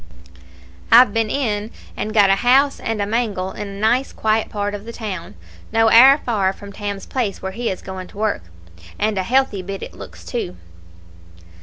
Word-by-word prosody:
I've 230 -2 +7
been 225 -1 0
in 215 -5 -1 0.3
and 215 - -3
got 205 -3 +5
a 195 - +3
house 270 +5 +3
and 225 -1 -3
a 200 - 0
mangle 205 -4 -1
in 210 - -6
a 200 0 -8
nice 240 +5 +1
quiet 220 0 0
part 205 -1 -3
of 205 0 -7
the 230 - -7
town, 205 -7 -6 0.4
no 225 0 +3
owre 265 +5 +8
far 200 -5 +1
from 200 0 -11
Tam's 200 -1 -5
place 235 -7 -3
where 190 - -3
he 230 +4 -3
is 190 - -5
going 190 -1 -7
to - - -16
work, 215 0 -1 0.6
and 215 +1 0
a - - +2
healthy 250 -1 +1
bit 195 +1 -6
it - - -8
looks, - - -12
too." 90 0 -4
210 Hz, 190 wpm, -20 LUFS, 195-230 Hz, 0.6 s, owre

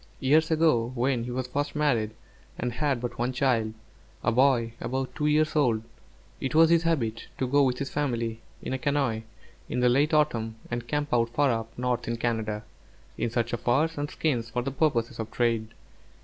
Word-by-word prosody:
Years 155 +4 +3
ago 155 -8 +3
when 125 -1 +1
he - - -5
was 125 +1 -2
first 145 +3 -3
married, 120 -8 +1 0.4
and 120 0 -2
had 140 -2 0
but 120 -1 -5
one 120 +2 +1
child, 120 -4 +1 0.5
a - - +2
boy 120 -2 +3
about 130 +1 -2
two 150 - -1
years 155 +1 +2
old, 120 -7 +2 0.6
it 135 +3 -3
was 165 +1 +6
his 170 -1 +5
habit 120 -10 -1
to 130 - 0
go 140 +3 +3
with 130 -2 +2
his 140 - -4
family, 115 -6 -2 0.2
in - - -3
a 130 - -2
canoe, 135 -6 0 0.5
in - - -1
the 125 0 +4
late 140 +5 +3
autumn, 120 -8 +1 0.2
and 120 0 -3
camp 145 +1 -1
out 115 -1 +3
far 140 +3 +2
up 115 -1 -4
north 125 -1 -1
in 115 0 -1
Canada, 110 -2 -1 0.5
in - - -1
search 120 +1 -1
of 120 - -1
furs 155 +8 +1
and 145 0 -3
skins 120 -7 -1
for 120 +1 -2
purposes 130 -3 0
of 110 0 -3
trade. 115 -2 0
125 Hz, 190 wpm, -27 LUFS, 115-145 Hz, 0.6 s, was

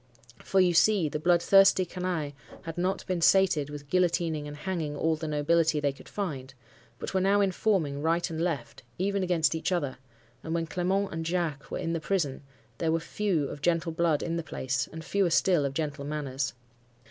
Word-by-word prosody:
For 195 - +1
you 180 -2 +4
see, 185 -2 +4
the 150 - -3
bloodthirsty 180 +3 +5
canaille 180 -4 -3 0.3
had 165 -1 -6
not 185 +2 -1
been 180 -2 -2
sated 165 -5 +4
with 145 -1 -8
guillotining 165 -3 +1
and 145 0 -8
hanging 155 -2 -3
all 160 +1 +1
the 160 0 -5
nobility 155 +1 +2
they 145 -1 +1
could - - -15
find, 135 -10 -5 0.4
but - - -6
were 190 - +2
now 200 +2 +3
informing, 185 -7 +1
right 165 +2 +1
and 165 -2 -4
left, 135 -7 -3 0.2
even 200 +2 0
against 170 -4 +2
each 160 +3 -2
other; 145 -8 -1 0.4
and 160 +1 -3
when 165 -1 0
Clement 185 +4 -1
and 165 0 -3
Jacques 165 -4 -2
were - - -3
in 165 - -2
the 165 - -1
prison, 160 -6 -1 0.4
there 165 -1 +1
were 165 - +2
few 165 -3 -1
of 145 - -8
gentle 165 0 +1
blood 160 -2 +1
in 170 0 -2
the - - -1
place, 135 -2 -2
and 160 0 -8
fewer 195 -1 +1
still 170 -2 +3
of 135 0 -3
gentle 145 -2 -3
manners. 140 -3 -3
165 Hz, 195 wpm, -28 LUFS, 150-180 Hz, 0.4 s, bloodthirsty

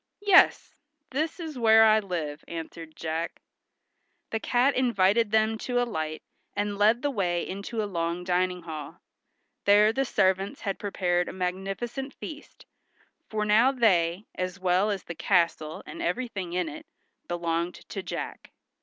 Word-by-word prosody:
"Yes, 395 -3 +5 0.4
this 315 +6 -2
is 315 -6 -6
where 225 -1 +7
I 220 0 +6
live," 165 -7 -4
answered 165 -1 -7
Jack. 165 +1 -3 0.9
The 220 - -1
cat 250 +4 +2
invited 230 -3 +3
them 220 +1 +2
to 245 -1 -1
alight 160 -10 -2 0.3
and 205 0 -2
led 220 +5 +4
the 290 - +1
way 175 -7 -1
into 200 +4 -4
a - - -1
long 170 -2 -2
dining 180 0 0
hall. 155 -3 -7 0.7
There 210 +2 +6
the 270 - +1
servants 190 -5 +1
had 195 -1 -3
prepared 180 -3 0
a - - -7
magnificent 195 +9 -4
feast, 305 -1 -10 0.6
for 215 -1 -1
now 220 +5 +5
they, 190 -7 +2
as 185 +1 -4
well 185 +3 +2
as 200 -2 -2
the 175 - -6
castle 165 -2 0
and 335 - -8
everything 230 - -3
in 180 -1 0
it, 150 - -8 0.4
belonged 170 0 -1
to 195 - -4
Jack. - - -6
195 Hz, 145 wpm, -27 LUFS, 175-230 Hz, 0.9 s, where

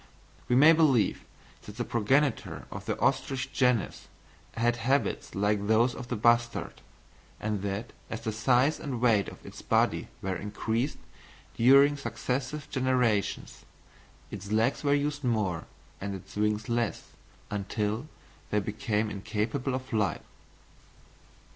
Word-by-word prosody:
We 125 - +2
may 150 +5 +8
believe 145 -9 +3 0.4
that 105 +1 -10
the 120 - -1
progenitor 130 +4 +1
of - - -8
the - - -1
ostrich 130 -1 0
genus 125 -5 +1 0.5
had 120 +1 +2
habits 125 0 0
like 100 +1 +1
those 115 +3 +4
of 125 - -8
the 125 - -2
bustard, 120 +2 +1 0.6
and 105 -2 -2
that, 100 +4 -4 0.2
as 115 - -5
the 115 -1 -2
size 125 +7 +2
and 130 -5 -4
weight 115 -5 +3
of - - -14
its - - -10
body - - +1 0.2
were 95 -1 -1
increased 110 - -2 0.6
during 140 +4 +6
successive 140 +1 -3
generations, 125 -6 0 0.7
its 100 0 -7
legs 110 +7 +1
were 145 0 +3
used 145 0 -1
more 105 -9 0 0.4
and 100 0 -3
its 95 0 -11
wings 105 0 0
less, 115 -6 -2 0.4
until 105 +5 -2 0.4
they 105 - +2
became 105 +1 -1
incapable 110 +6 -2
of 130 - -3
flight. 110 -5 -1
115 Hz, 130 wpm, -29 LUFS, 105-130 Hz, 0.7 s, may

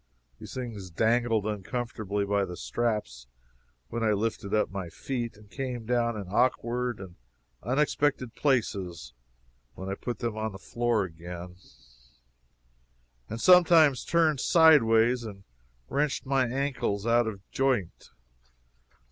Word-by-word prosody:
These - - -10
things 115 -7 -6
dangled 115 +3 +1
uncomfortably 105 -1 -3
by 100 0 +1
the 90 -2 -6
straps 105 - -2 0.6
when 115 - -3
I 110 -1 +3
lifted 105 -1 -2
up 110 - +1
my 95 -3 -5
feet, 120 +2 -4
and 105 0 -17
came 125 0 -5
down 120 -1 0
in 100 - -6
awkward 120 +2 0
and 95 -3 -10 0.4
unexpected 135 0 0
places 95 - -1 0.6
when 95 +1 -6
I - - -1
put 120 +4 -5
them 115 -3 -3
on 110 -1 -3
the - - -8
floor 120 0 0
again, 85 +1 -8 1.7
and 110 - -5
sometimes 165 -5 +6
turned 160 -4 +2
sideways 125 -8 +5
and 100 -3 -9 0.4
wrenched 145 0 -1
my 135 -1 +2
ankles 125 -6 -2
out 120 0 +3
of 100 -2 -7
joint. 130 -10 -1
115 Hz, 125 wpm, -28 LUFS, 100-125 Hz, 1.7 s, sometimes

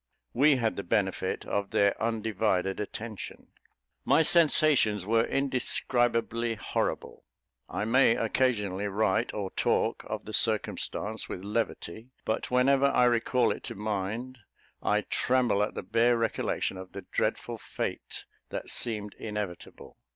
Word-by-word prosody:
We 140 +3 +5
had 115 -3 -1
the 100 - -3
benefit 95 -1 -1
of 100 -1 -2
their 100 0 +3
undivided 110 -4 0
attention. 110 +1 -7 0.5
My 160 - +4
sensations 150 - +4
were 115 +2 +3
indescribably 120 -3 +1
horrible. 105 - -3 0.5
I - - -2
may 115 0 +4
occasionally 105 -5 0
write 105 +2 +1
or 100 -3 -4
talk - - 0
of - - -4
the - - -8
circumstance 110 +1 -1
with 90 - -6
levity, 110 0 -3 0.2
but 110 - -2
whenever 135 +2 +3
I 125 -3 +3
recall 120 0 +2
it - - -4
to 120 - -5
mind, 110 +5 -3 0.4
I - - +2
tremble 125 -5 +1
at 105 - -1
the - - -4
bare 115 +4 +3
recollection 115 -4 -1
of 95 0 -10
the - - -7
dreadful - - -2
fate - - -5 0.2
that - - -4
seemed 105 -3 -2
inevitable. 105 -5 -6
115 Hz, 130 wpm, -28 LUFS, 100-125 Hz, 0.5 s, We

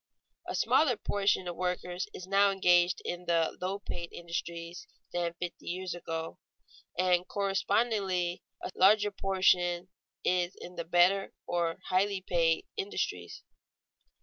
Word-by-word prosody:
_ - - -1
A - - -3
smaller 285 -6 +3
proportion 200 -2 +1
of 175 - -4
workers 180 +1 -2
is 185 - -8
now 200 +1 +4
engaged 180 -2 +3
in 175 0 -4
the 165 -1 +2
low 190 +2 -1
paid 170 -4 -6
industries 170 0 -5 0.3
than 170 -1 -1
fifty 175 0 -6
years 185 +1 -3
ago, 165 -2 -5 0.6
and 180 -1 +3
a - - -19
correspondingly 195 -2 0 0.3
larger 205 +2 +5
proportion 185 -2 +2 0.3
is 180 0 +1
in 180 - -9
the 170 - -4
better, 180 +3 +3
or 170 -1 0
highly 195 +1 +2
paid, 170 -3 +1
industries. 410 0 -3
180 Hz, 130 wpm, -30 LUFS, 175-195 Hz, 0.6 s, larger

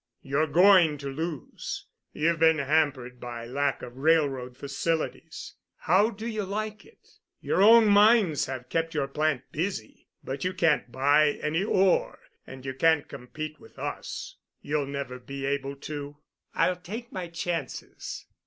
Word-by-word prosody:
You're 145 +3 +1
going 175 -1 +5
to 140 -1 -6
lose. 155 +1 -5 0.3
You've 165 +1 0
been 160 0 +5
hampered 140 -4 0
by 120 -1 -7
lack 140 +3 -1
of 120 +1 -9
railroad 135 -4 +1
facilities. 155 +4 -3 0.2
How 195 +6 +3
do 220 0 -8
you 215 -3 -2
like 215 +2 -4
it? 460 - -22 0.3
Your - - 0
own 225 +2 +8
mines 205 - +5
have 130 -1 -6
kept 165 0 -1
your 140 -2 0
plant 150 -2 0
busy, 165 - -4 0.2
but 135 +1 -5
you 185 +1 -1
can't 150 -9 +2
buy 145 +3 +4
any 160 +5 0
ore 190 -3 +2 0.3
and 130 0 -10
you 135 - -3
can't 160 +2 +2
compete 155 +5 -7
with - - -18
us. - - -6 0.2
You'll 145 -1 -2
never 140 -3 -5
be 135 +2 -6
able 140 0 -2
to." 145 0 -7 0.4
"I'll 180 - +2
take 220 +8 -8
my 180 -2 -5
chances." 170 -3 -5
155 Hz, 150 wpm, -27 LUFS, 135-180 Hz, 0.4 s, own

